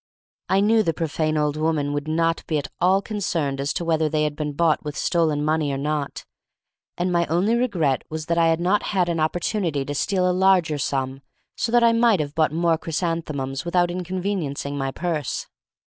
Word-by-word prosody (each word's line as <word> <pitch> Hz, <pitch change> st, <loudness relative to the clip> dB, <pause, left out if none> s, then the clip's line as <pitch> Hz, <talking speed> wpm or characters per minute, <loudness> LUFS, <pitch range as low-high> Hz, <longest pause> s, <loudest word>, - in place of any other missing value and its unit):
I 190 Hz, +1 st, +3 dB
knew 220 Hz, +2 st, +4 dB
the 165 Hz, -7 st, 0 dB
profane 155 Hz, -1 st, -1 dB
old 150 Hz, -1 st, +1 dB
woman 155 Hz, -2 st, 0 dB
would 145 Hz, +1 st, -3 dB
not 165 Hz, +1 st, 0 dB
be 155 Hz, -, 0 dB
at 140 Hz, -2 st, -4 dB
all 190 Hz, +3 st, +3 dB
concerned 165 Hz, -10 st, -2 dB
as 140 Hz, -, -1 dB
to 170 Hz, -, -3 dB
whether 160 Hz, -2 st, +1 dB
they 155 Hz, 0 st, +1 dB
had 150 Hz, -1 st, -1 dB
been 150 Hz, -1 st, -3 dB
bought 160 Hz, +1 st, +2 dB
with 150 Hz, -1 st, -5 dB
stolen 155 Hz, -4 st, +1 dB
money 155 Hz, -2 st, +1 dB
or 135 Hz, -, -2 dB
not, 145 Hz, 0 st, -3 dB, 0.7 s
and 180 Hz, +1 st, 0 dB
my 170 Hz, -1 st, +1 dB
only 180 Hz, +7 st, +1 dB
regret 180 Hz, -, +1 dB
was 155 Hz, 0 st, -5 dB
that 170 Hz, +1 st, 0 dB
I 165 Hz, -, +4 dB
had 165 Hz, 0 st, +2 dB
not 185 Hz, +4 st, +2 dB, 0.2 s
had 180 Hz, -2 st, +2 dB
an 165 Hz, -1 st, -1 dB
opportunity 165 Hz, -2 st, -1 dB
to 145 Hz, -, -4 dB
steal 185 Hz, +5 st, +1 dB
a 180 Hz, -, +2 dB
larger 180 Hz, -5 st, +3 dB
sum 135 Hz, -1 st, -2 dB, 0.3 s
so 230 Hz, -, -2 dB
that 240 Hz, 0 st, +4 dB
I 230 Hz, 0 st, +5 dB
might 230 Hz, -4 st, +4 dB
have 145 Hz, -1 st, -3 dB
bought 155 Hz, -2 st, +2 dB
more 165 Hz, 0 st, +1 dB
chrysanthemums 155 Hz, -5 st, -3 dB
without 175 Hz, 0 st, +1 dB
inconveniencing 180 Hz, -6 st, -3 dB
my 135 Hz, -1 st, -2 dB
purse. 155 Hz, -2 st, -3 dB
160 Hz, 200 wpm, -23 LUFS, 150-180 Hz, 0.7 s, I